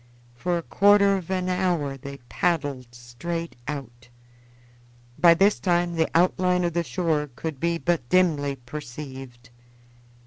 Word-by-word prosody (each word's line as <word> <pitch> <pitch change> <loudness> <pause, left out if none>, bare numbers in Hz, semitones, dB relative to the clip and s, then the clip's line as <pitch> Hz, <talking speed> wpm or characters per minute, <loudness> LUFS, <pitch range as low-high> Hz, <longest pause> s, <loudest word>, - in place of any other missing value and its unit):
For 175 +9 -1
a 170 - -4
quarter 200 +1 +4
of 185 -3 -5
an 185 -1 -1
hour 180 -6 0
they 140 +1 -9
paddled 145 -7 -1
straight 165 +8 -6
out. 120 -4 -7 1.1
By 170 -1 +7
this 195 +4 +3
time 175 -1 +1
the 160 -1 +1
outline 180 +1 +3
of 170 -1 -1
the 170 - +1
shore 150 +1 -1
could 155 -1 -5
be 170 +2 0
but 165 -8 -1
dimly 155 -7 +2
perceived. 130 -2 -9
165 Hz, 135 wpm, -25 LUFS, 135-180 Hz, 1.1 s, By